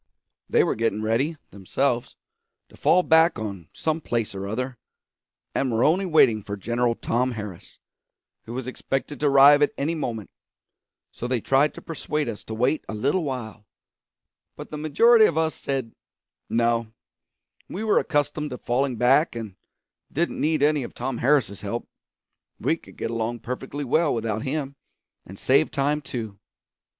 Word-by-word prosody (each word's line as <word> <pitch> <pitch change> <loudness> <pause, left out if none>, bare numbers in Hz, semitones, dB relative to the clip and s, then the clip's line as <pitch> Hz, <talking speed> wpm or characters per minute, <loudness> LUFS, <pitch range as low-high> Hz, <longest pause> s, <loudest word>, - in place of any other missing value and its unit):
They - - +4
were - - +1
getting 110 -1 -1
ready, 130 +9 0
themselves, 120 +6 -1 0.5
to - - -17
fall 180 - +3
back 160 -1 +4
on 100 -7 -6
some 160 0 -2
place 115 -7 -2
or 100 0 -5
other, 125 +3 -4 0.7
and 135 -2 0
were 115 +1 +2
only 185 +5 +3
waiting 125 -10 +4
for 100 0 -6
General 120 +3 0
Tom 125 +3 0
Harris, 105 -6 -8 0.7
who 115 - -7
was 130 -1 -4
expected 135 +2 -3
to 150 - +2
arrive 140 +1 +7
at 145 - +3
any 150 +4 0
moment; 115 -10 -4 0.8
so 120 - -5
they 125 -1 0
tried 135 +6 +2
to - - -10
persuade 150 -2 -3
us 110 -3 -5
to 110 - -5
wait 125 +7 +1
a 110 - -4
little 140 - +1
while, 120 -7 -5 0.9
but - - -10
the - - -4
majority 220 +10 +5
of 160 - +1
us 160 -1 +1
said 135 -4 -3 0.6
no, 115 0 +1 0.8
we 200 - -4
were 215 - +3
accustomed 150 -1 -1
to 125 - -6
falling 130 +2 0
back, 130 +5 +3
and 110 -5 -6 0.6
didn't 170 +4 -1
need 155 -1 +1
any 150 0 +3
of 120 - -7
Tom 125 0 -3
Harris's 130 -7 +2
help; 105 +4 -4 0.7
we - - +1
could - - -17
get - - -3
along 115 +1 -2
perfectly 135 +3 -5
well 150 +4 +2
without 110 -2 -2
him 140 +1 -3 0.5
and 95 - -10
save 140 +8 +3
time 145 +2 0
too. 110 -7 -6
130 Hz, 160 wpm, -24 LUFS, 115-150 Hz, 0.9 s, arrive